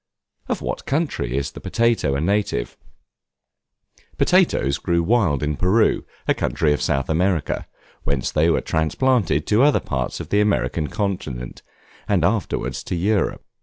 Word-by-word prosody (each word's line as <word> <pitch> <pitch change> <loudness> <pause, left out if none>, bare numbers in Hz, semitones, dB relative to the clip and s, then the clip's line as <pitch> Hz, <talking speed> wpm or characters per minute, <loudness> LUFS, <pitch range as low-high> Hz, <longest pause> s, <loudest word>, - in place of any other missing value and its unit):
Of - - -2
what - - -4
country 135 - -1
is 70 0 -2
the - - -10
Potato 115 -12 +1
a 70 - -1
native? 95 -9 -1 1.4
Potatoes 70 +1 +2
grew 85 0 +1
wild 90 - +2
in 75 0 0
Peru, 95 +8 +2 0.2
a - - +4
country 75 -2 0
of 75 - -2
South 70 0 0
America; 85 0 0 0.4
whence 70 -2 -1
they 80 +2 +3
were - - +2
transplanted 80 - +1
to 105 +3 +3
other 145 +1 +5
parts 65 -3 -3
of - - -7
the 105 - +3
American 100 -6 0
continent, 85 - -4 0.5
and - - +2
afterwards 65 0 -1
to - - -3
Europe. 100 +4 0
85 Hz, 145 wpm, -22 LUFS, 70-105 Hz, 1.4 s, other